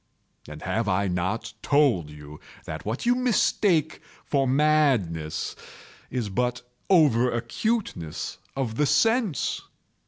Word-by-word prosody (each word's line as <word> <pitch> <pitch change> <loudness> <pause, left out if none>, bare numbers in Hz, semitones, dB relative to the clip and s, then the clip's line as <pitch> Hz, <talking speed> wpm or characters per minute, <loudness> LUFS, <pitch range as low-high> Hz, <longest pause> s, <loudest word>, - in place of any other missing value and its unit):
And 75 0 -9
have 105 +4 -1
I 100 +1 +1
not 95 +6 -2
told 135 - +2
you 75 0 -11 0.3
that - - -6
what 115 - -3
you 245 - +5
mistake 205 - +1 0.2
for 135 -2 +1
madness 130 - +1 0.5
is 120 -4 -2
but 125 +5 -1 0.3
over 140 -10 +5
acuteness 120 - -3 0.2
of 125 -5 -3
the 150 - +2
sense? 225 - +1
125 Hz, 115 wpm, -25 LUFS, 95-155 Hz, 0.5 s, you